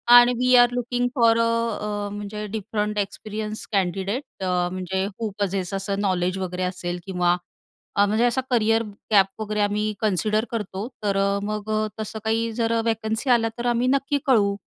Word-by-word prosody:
आणि 245 0 +8
we 255 0 +4
R 245 0 +7
looking 245 0 0
four 230 -3 +5
अ, 230 - +4 0.4
अ, 205 -1 -3
म्हणजे 205 +1 -5
different 210 0 -3
experience 215 +2 -4
candidate 195 +4 -2
अ, 185 - 0 0.2
म्हणजे 185 +1 -2
व्हू 215 +2 -4
पसेस 195 -1 -1
असं 195 +1 -2
अ, - - +1
नॉलेज 185 -2 0
वगैरे 185 -1 -3
असेल 180 -1 -3
किंवा 180 -2 +2 0.6
अ, 205 - +5
म्हणजे 220 +4 +2
असा 245 +2 +2
करियर 225 -1 +3 0.3
गॅप 195 +1 +3
वगैरे 210 0 -1
आम्ही 210 +1 0
कन्सिडर 215 +1 +1
करतो, 210 -1 -3 0.2
तर 200 -1 +1
अ, 200 0 +2
मग 215 0 -3 0.3
तसं 220 0 -4
काही 225 +1 +1
जर 230 0 +1
अ, 225 - +2
व्हॅकन्सी 225 +2 -1
आल्या 225 -1 +4
तर 240 - -4
आम्ही 245 +2 +1
नक्की 275 +2 +2
कळवू. 205 -6 +4
210 Hz, 175 wpm, -24 LUFS, 195-230 Hz, 0.6 s, आणि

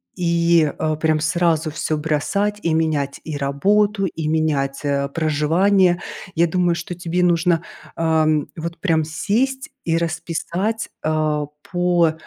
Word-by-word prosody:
и, 170 -3 +3
э, 155 -1 0
прям 155 -1 +1
сразу 160 -1 +1
всё 155 0 -2
бросать 200 +7 -1
и 165 -1 0
менять 150 -4 0
и 155 -3 -4
работу, 195 +9 +1
и 160 -3 -3
менять, 150 -3 0
э, 140 -1 0
проживание. 170 +5 +2 0.4
Я 170 - +4
думаю, 175 0 +1
что 170 +1 -5
тебе 175 0 -1
нужно, 170 -1 +2 0.3
ам, 155 -2 +1
вот 165 +1 -5
прям 165 -5 +2
сесть 240 - -1 0.2
и 165 0 +1
расписать, 170 +6 -2
а, 155 -1 0 0.3
по, 175 -2 +2
165 Hz, 130 wpm, -21 LUFS, 155-180 Hz, 0.4 s, Я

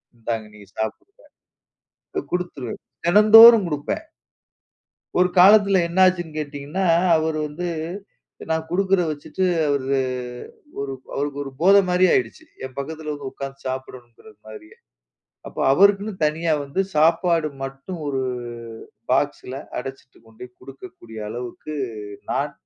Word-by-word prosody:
"இந்தாங்க 115 -1 -4
நீ 105 - -14 0.2
சாப்பிடுங்க." 110 - -6 1.0
அ - - -7
குடுத்துருவேன். 175 -10 -4 0.3
தினந்தோறும் 215 +3 +9
குடுப்பேன். 150 - -3 1.1
ஒரு 180 0 +4
காலத்தில 200 0 +6
என்னாச்சுன்னு 175 -3 +2
கேட்டீங்கன்னா, 150 +5 -4 0.3
அவர் 160 0 -1
வந்து 165 +4 -5 0.8
நான் 160 0 -1
குடுக்குறத 190 0 +1
வச்சுட்டு, 150 +5 -3 0.2
அவரு 140 -1 0 0.8
ஒரு 140 -1 -3 0.2
அவருக்கு 145 0 -3
ஒரு 135 - -8
போதை 195 +3 +7
மாரி 180 +1 +4
ஆயிடுச்சு. 340 -5 -1 0.2
என் 130 -1 -10
பக்கத்தில 155 +2 -5
வந்து 145 -2 -6
உட்காந்து 135 0 -8
சாப்பிடணுங்கிற 130 - -8 0.2
மாதிரியே. 110 0 -12 0.7
அப்போ - - -7
அவருக்குன்னு 200 +5 +4
தனியா 160 +2 0
வந்து 140 +7 -2
சாப்பாடு 165 +1 +3
மட்டும் 135 +6 -7
ஒரு 135 -2 -1 0.9
பாக்ஸ்ல 130 +1 -1 0.2
அடைச்சுட்டு 135 0 -9
கொண்டே 115 +2 -11
குடுக்கக்கூடிய 135 -4 -12
அளவுக்கு, 120 +6 -7 0.6
நான் - - -1
155 Hz, 110 wpm, -22 LUFS, 135-185 Hz, 1.1 s, தினந்தோறும்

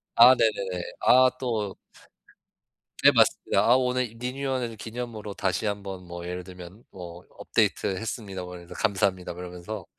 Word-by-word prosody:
아 120 +2 +9
네네네. 95 -7 0 0.2
아 130 0 +7
또 110 -6 -2 1.3
네 - - +9
맞습니다. 100 - +3
아 120 - +5
오늘 125 -1 0
이 115 - -17
리뉴얼해 130 +1 -2
준 115 - -10
기념으로 110 -3 -6
다시 95 +2 -1
한번 100 -3 -5
뭐 85 0 -7
예를 90 0 -5
들면 90 +4 -12
뭐 90 -1 -10
"업데이트했습니다." 100 -1 -1
뭐 90 0 -8
이러면서 85 -1 -10
"감사합니다." 95 -3 0
뭐 90 - -9
이러면서 90 +2 -7
100 Hz, 340 characters per minute, -26 LUFS, 90-120 Hz, 1.3 s, 아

